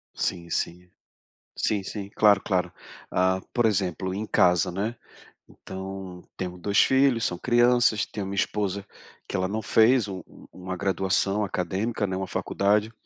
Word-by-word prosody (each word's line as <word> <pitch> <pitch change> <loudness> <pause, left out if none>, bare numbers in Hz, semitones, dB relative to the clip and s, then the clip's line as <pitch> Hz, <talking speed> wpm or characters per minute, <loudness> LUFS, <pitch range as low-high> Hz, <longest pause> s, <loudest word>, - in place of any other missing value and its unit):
Sim, 85 -1 -2
sim. 90 +2 -3 0.7
Sim, 100 -3 0
sim, 100 0 -6
claro, 105 -2 +5
claro. 90 -2 0 0.4
Ah, 95 +1 +2
por 120 -2 +2
exemplo, 95 -3 0
em 105 +3 -3
casa, 90 -4 +3
né, 105 +6 -2 0.5
então, 95 -1 -8
temos 90 -1 -5
2 100 +3 +1
filhos, 130 -3 +3
são 90 - -1
crianças, 120 -2 +3
tenho 100 -2 -5
uma 100 - -5
esposa, 100 0 -1 0.4
que - - -5
ela 95 0 +1
não 110 +3 -3
fez 110 +1 +4
u 95 -3 -6
u - - -16
uma 95 0 -6
graduação 95 +2 +1
acadêmica, 100 +4 -2
né, 95 0 -3
uma 95 -1 -3
faculdade. 105 +5 0
95 Hz, 150 wpm, -26 LUFS, 95-105 Hz, 0.7 s, claro